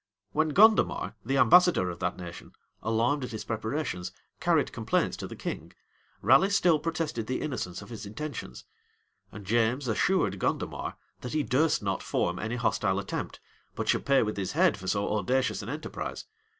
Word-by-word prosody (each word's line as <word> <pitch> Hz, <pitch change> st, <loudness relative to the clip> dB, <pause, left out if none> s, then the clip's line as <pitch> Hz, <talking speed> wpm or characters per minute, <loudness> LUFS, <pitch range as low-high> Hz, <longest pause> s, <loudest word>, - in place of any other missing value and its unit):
When 155 Hz, +1 st, +1 dB
Gondomar, 215 Hz, +7 st, +4 dB
the 135 Hz, +4 st, 0 dB
ambassador 140 Hz, -, +5 dB
of 85 Hz, -, -9 dB
that 90 Hz, -1 st, -2 dB
nation, 85 Hz, -2 st, -9 dB, 0.3 s
alarmed 115 Hz, +6 st, +1 dB
at 125 Hz, -, -4 dB
his 110 Hz, -3 st, -5 dB
preparations, 110 Hz, -, -3 dB, 0.3 s
carried -, -, +2 dB
complaints -, -, 0 dB
to -, -, -5 dB
the -, -, -8 dB
king, -, -, -6 dB, 0.5 s
Raleigh 135 Hz, -, +6 dB
still 175 Hz, -5 st, +3 dB
protested 155 Hz, -8 st, -2 dB
the 130 Hz, -, -1 dB
innocence 100 Hz, -11 st, -4 dB
of -, -, -14 dB
his 115 Hz, -3 st, -7 dB
intentions; 120 Hz, -, -6 dB, 0.7 s
and 105 Hz, -2 st, -10 dB
James 120 Hz, +5 st, +1 dB
assured 110 Hz, -, +1 dB
Gondomar, -, -, -2 dB, 0.2 s
that 125 Hz, -, -6 dB
he 155 Hz, -1 st, +1 dB
durst 140 Hz, +2 st, +2 dB
not 95 Hz, -2 st, -1 dB
form 90 Hz, 0 st, -1 dB
any 110 Hz, +2 st, -3 dB
hostile 105 Hz, -5 st, +1 dB
attempt, 100 Hz, -, -4 dB, 0.4 s
but -, -, -3 dB
should -, -, +2 dB
pay 135 Hz, -2 st, +5 dB
with 105 Hz, -1 st, -3 dB
his 95 Hz, -2 st, -2 dB
head 180 Hz, +1 st, +4 dB
for 95 Hz, -1 st, -9 dB
so 100 Hz, +1 st, 0 dB
audacious 125 Hz, +5 st, 0 dB
an 105 Hz, -, -7 dB
enterprise. 150 Hz, +4 st, -5 dB
120 Hz, 170 wpm, -28 LUFS, 100-150 Hz, 0.7 s, Raleigh